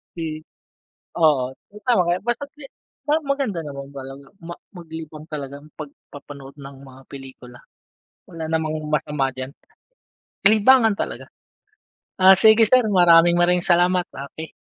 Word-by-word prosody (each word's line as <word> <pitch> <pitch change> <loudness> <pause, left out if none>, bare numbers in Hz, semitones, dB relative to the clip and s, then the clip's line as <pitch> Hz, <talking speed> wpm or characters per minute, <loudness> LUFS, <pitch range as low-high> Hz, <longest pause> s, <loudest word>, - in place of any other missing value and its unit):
Si 155 -2 -5 0.8
oo, 135 -6 +2 0.3
tama 235 -7 +3
ka - - +2
diyan, - - -15
basta 240 +4 -2
si 295 - -14 0.4
parang 305 +1 0
maganda 275 -11 -1
naman 140 -1 -8
talaga 135 0 -10 0.2
ma 170 - -7 0.2
maglibang 160 -2 -10
talaga 140 -2 -6 0.2
'pag 150 -2 -8 0.2
papanood 140 -1 -11
ng 135 0 -11
mga 135 -1 -15
pelikula. 130 -3 -12 0.7
Wala 165 -1 -7
namang 155 -1 -1
masama 150 -3 -1
diyan. 130 +1 -7 1.0
Libangan 220 +1 +4
talaga. - - -5 0.9
Ah, 190 +1 +8
sige 220 +2 +6
sir, 255 +3 +4
maraming 175 -3 +5
maraming 175 0 +2
salamat. 180 0 +2
Okey. 150 +3 -9
160 Hz, 130 wpm, -21 LUFS, 140-185 Hz, 1.0 s, Ah